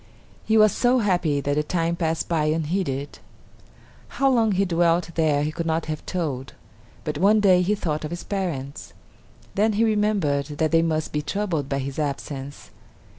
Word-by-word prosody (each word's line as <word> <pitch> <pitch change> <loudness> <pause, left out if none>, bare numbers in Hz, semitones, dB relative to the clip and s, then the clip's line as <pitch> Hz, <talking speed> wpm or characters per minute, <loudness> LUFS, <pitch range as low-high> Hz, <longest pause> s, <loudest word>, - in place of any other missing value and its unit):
He 220 - +3
was 215 -1 +6
so 245 +5 +2
happy 175 - +1
that 145 +1 -1
the - - +3
time 165 +2 -1
passed 165 -1 -1
by 160 -3 +1
unheeded. 155 -2 -2 1.0
How 275 0 +3
long 225 -4 +3
he 195 +1 +2
dwelt 170 -1 +1
there 155 -3 +2
he 150 - -1
could 165 +1 -4
not 160 0 0
have 155 -1 -5
told. 145 -8 -3 0.5
But 150 -1 -3
one 205 +4 +5
day 185 -3 +5
he 200 +4 +1
thought 155 -6 -3
of 155 - -4
his 175 0 -6
parents; 160 -9 -4 0.6
then 215 +2 +2
he 215 +3 +2
remembered 210 -10 +1
that 155 0 +1
they 165 0 +4
must 160 -1 -1
be 150 - 0
troubled 165 -4 -2
by 140 - -1
his 135 +2 -4
absence. 140 -1 -5
165 Hz, 180 wpm, -24 LUFS, 150-195 Hz, 1.0 s, was